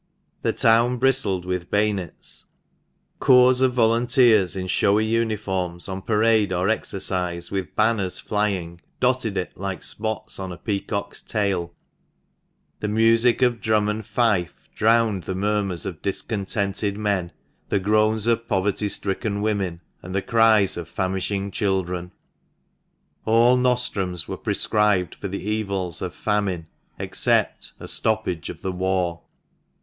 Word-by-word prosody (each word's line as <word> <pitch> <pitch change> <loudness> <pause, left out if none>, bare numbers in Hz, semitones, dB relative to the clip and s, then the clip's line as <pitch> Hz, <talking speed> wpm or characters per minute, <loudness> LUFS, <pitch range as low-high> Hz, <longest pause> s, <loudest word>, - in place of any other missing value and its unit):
The - - +1
town 120 +2 +3
bristled 120 -8 +1
with 90 -1 -3
bayonets; 105 -3 -2 0.7
corps 125 -1 +5
of 130 -1 +2
volunteers 115 -4 +3
in 95 -1 -3
showy 100 +3 +2
uniforms, 105 -6 -1
on 95 0 -5
parade 110 -1 +2
or 90 +2 0
exercise, 90 -5 -2
with 95 -5 -4
banners 105 -4 +1
flying, 95 -5 -2 0.2
dotted 125 -5 +1
it 90 - -3
like 95 -1 -4
spots 110 0 -2
on 95 -1 -5
a 90 - -7
peacock's 100 -1 -4
tail; 95 -5 -2 1.0
the 105 - -2
music 115 +3 +3
of 120 -4 +1
drum 110 -1 +2
and 105 +1 -2
fife 105 -5 0
drowned 110 -5 +2
the 95 - -3
murmurs 100 -2 -1
of 90 -5 -6
discontented 100 0 -2
men, 100 -5 -1 0.4
the - - +2
groans 110 +2 +2
of 115 0 +1
poverty 100 +1 0
stricken 100 +1 -1
women, 100 -5 -1 0.2
and 90 +2 -7
the 95 - 0
cries 110 -4 +4
of 85 -1 -6
famishing 95 +1 -2
children. 90 -3 -1 1.1
All 115 +3 +5
nostrums 120 -9 -1
were - - -4
prescribed 105 -4 +1
for - - -6
the 100 +1 -5
evils 100 -6 -1
of 90 -1 -4
famine 100 -5 -1 0.3
except - - +1
a - - -8
stoppage 110 -7 -1
of - - -9
the 95 - -1
war. 90 -2 -1
100 Hz, 130 wpm, -23 LUFS, 95-110 Hz, 1.1 s, corps